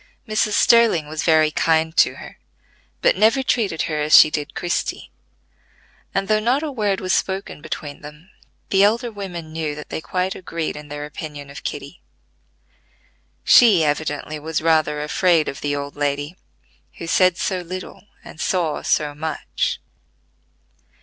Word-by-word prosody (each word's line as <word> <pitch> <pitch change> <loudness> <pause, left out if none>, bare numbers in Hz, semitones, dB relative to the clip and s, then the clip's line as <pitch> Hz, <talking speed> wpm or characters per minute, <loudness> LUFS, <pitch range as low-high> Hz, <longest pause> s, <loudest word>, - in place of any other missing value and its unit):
Mrs. 215 0 0
Sterling 230 -12 +4
was 155 0 -4
very 155 -2 +3
kind 160 +1 +1
to - - +4
her, - - -12 0.6
but - - +4
never 225 +5 +3
treated 215 -10 0
her 155 -1 -2
as 150 +1 +6
she 155 - +7
did 150 -1 -4
Christie; 175 - -3 1.0
and 195 0 -1
though 215 0 +3
not 250 +7 +1
a 305 - -3
word 210 -6 -1
was 185 -1 -1
spoken 190 -5 -2
between 145 -1 -6
them 150 +4 -13 0.4
the 195 - +4
elder 230 +3 +2
women 175 -6 -7
knew 155 -2 -3
that 150 - -9
they - - -4
quite 185 +3 -2
agreed 165 -3 -4
in 150 0 -9
their 145 0 -6
opinion 150 -1 -8
of 140 - -9
Kitty. 145 +4 -6 1.4
She 210 -9 +6
evidently 150 0 -2
was 160 +1 -2
rather 155 -2 +1
afraid 165 +1 +2
of 135 - -5
the 145 0 -1
old 140 0 -5
lady, 145 +2 -2 0.6
who - - -6
said 185 +1 +3
so 185 - -1
little 185 +3 -8 0.2
and - - -13
saw 170 -5 0
so 150 -1 0
much. 155 +2 -3
160 Hz, 155 wpm, -21 LUFS, 150-190 Hz, 1.4 s, she